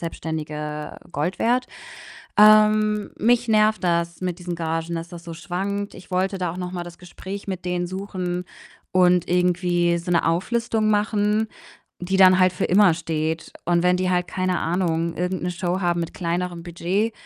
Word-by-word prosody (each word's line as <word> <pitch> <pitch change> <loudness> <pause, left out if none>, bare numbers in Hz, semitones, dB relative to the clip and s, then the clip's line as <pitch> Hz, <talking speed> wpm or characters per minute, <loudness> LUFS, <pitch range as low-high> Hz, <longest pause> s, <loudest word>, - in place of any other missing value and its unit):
Selbstständige 150 -2 -5 0.2
Gold 155 +6 -2
wert. 245 +2 +1 0.7
Ähm, 215 0 +5
mich 240 +2 +2
nervt 215 -1 +3
das 170 0 0
mit 180 -1 -2
diesen 175 -1 -5
Gagen, 165 0 -3
dass 165 0 -4
das 170 -1 -10
so 170 -1 -7
schwankt. 195 +5 -4
Ich 185 - -14
wollte 190 +2 0
da 180 -2 -2
auch 175 - -8
noch 180 0 -4
mal 175 -1 -4
das 175 0 -11
Gespräch 190 +3 -8
mit 185 -2 -5
denen 175 0 -1
suchen 185 -2 -4 0.5
und 180 -1 +4
irgendwie 175 -1 +2
so 170 +1 -4
'ne 170 - +3
Auflistung 215 +5 0
machen, 210 +1 +1 0.5
die 185 +2 -2
dann 185 -1 +7
halt 185 -1 +4
für 180 - -1
immer 195 -1 +5
steht. 160 0 -3
Und 170 0 +2
wenn 180 0 +3
die 185 0 0
halt, 180 -1 +1
keine 185 -1 -1
Ahnung, 170 -1 -1
irgend 180 +1 -2
'ne 180 - -1
Show 180 +1 -2
haben 175 -1 +1
mit 165 - -4
kleinerem 175 0 -3
Budget, 180 +6 -1
180 Hz, 175 wpm, -23 LUFS, 170-195 Hz, 0.7 s, dann